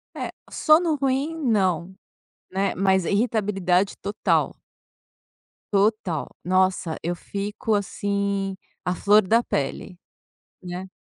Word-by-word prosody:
É, -, -, -4 dB, 0.2 s
sono 315 Hz, +1 st, +4 dB
ruim, 275 Hz, +3 st, 0 dB
não, 190 Hz, -, +1 dB, 0.6 s
né, 195 Hz, +1 st, 0 dB
mas 190 Hz, -1 st, +2 dB
irritabilidade 200 Hz, -3 st, +1 dB
total. 200 Hz, +1 st, 0 dB, 1.2 s
Total! 195 Hz, -5 st, +1 dB, 0.2 s
Nossa, 185 Hz, -2 st, +1 dB
eu 175 Hz, +1 st, -1 dB
fico, 205 Hz, +4 st, -2 dB
assim, 200 Hz, -1 st, -1 dB, 0.3 s
à 180 Hz, -, -1 dB
flor 205 Hz, +4 st, +5 dB
da 230 Hz, +4 st, +4 dB
pele, 175 Hz, +4 st, -3 dB, 0.6 s
né. 180 Hz, +1 st, -6 dB
200 Hz, 100 wpm, -24 LUFS, 185-215 Hz, 1.2 s, flor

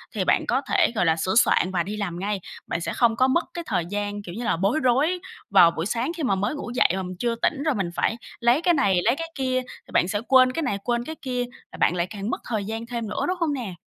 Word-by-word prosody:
thì -, -, 0 dB
bạn -, -, +2 dB
có -, -, +1 dB
thể, 350 Hz, -8 st, +3 dB
gọi 220 Hz, -, +2 dB
là, 160 Hz, -, +3 dB
sửa 185 Hz, +5 st, -1 dB
soạn 190 Hz, -4 st, +4 dB
và 175 Hz, -2 st, 0 dB
đi 205 Hz, +4 st, -5 dB
làm 180 Hz, -5 st, -3 dB
ngay. 200 Hz, +1 st, -2 dB, 0.3 s
Bạn 170 Hz, -, -2 dB
sẽ -, -, -3 dB
không 235 Hz, -2 st, +3 dB
có 255 Hz, +3 st, +3 dB
mất 265 Hz, +6 st, +2 dB
cái 345 Hz, -, -4 dB
thời 170 Hz, -, 0 dB
gian, 205 Hz, +2 st, -3 dB
kiểu 180 Hz, -3 st, -9 dB
như 235 Hz, -, -4 dB
là, 230 Hz, -, +1 dB
bối 200 Hz, -, +1 dB
rối 280 Hz, +9 st, +2 dB, 0.3 s
vào 180 Hz, -4 st, +7 dB
buổi 165 Hz, 0 st, -3 dB
sáng 235 Hz, -, -1 dB
khi 320 Hz, -, -3 dB
mà 255 Hz, -7 st, +2 dB
mới 205 Hz, +8 st, -1 dB
ngủ 285 Hz, -, -6 dB
dậy -, -, +4 dB
mà 190 Hz, -, -2 dB
mình 185 Hz, 0 st, -6 dB
chưa 235 Hz, -1 st, 0 dB
tỉnh 275 Hz, +4 st, 0 dB
rồi 305 Hz, -3 st, +1 dB
mình 195 Hz, -5 st, -1 dB
phải 225 Hz, -, 0 dB, 0.2 s
lấy 240 Hz, +4 st, +3 dB
cái 350 Hz, 0 st, +3 dB
này, 200 Hz, -, +3 dB
lấy 235 Hz, +3 st, +3 dB
cái 330 Hz, +2 st, -6 dB
kia, 255 Hz, -2 st, 0 dB, 0.3 s
thì -, -, -15 dB
bạn -, -, +3 dB
sẽ 205 Hz, +2 st, -1 dB
quên 255 Hz, -1 st, +6 dB
cái 325 Hz, +5 st, -2 dB
này, 205 Hz, -8 st, -1 dB
quên 240 Hz, -1 st, 0 dB
cái 315 Hz, -, -6 dB
kia, 250 Hz, -2 st, -2 dB, 0.3 s
và -, -, -10 dB
bạn 175 Hz, -, +2 dB
lại 175 Hz, 0 st, 0 dB
càng 205 Hz, 0 st, -5 dB
mất -, -, -3 dB
thời 215 Hz, -4 st, -1 dB
gian 225 Hz, +2 st, -4 dB
thêm 235 Hz, -2 st, -4 dB
nữa, -, -, -2 dB
đúng 365 Hz, +1 st, -1 dB
không 325 Hz, -4 st, +1 dB
nè? 240 Hz, -9 st, -4 dB
230 Hz, 290 wpm, -24 LUFS, 195-260 Hz, 0.3 s, vào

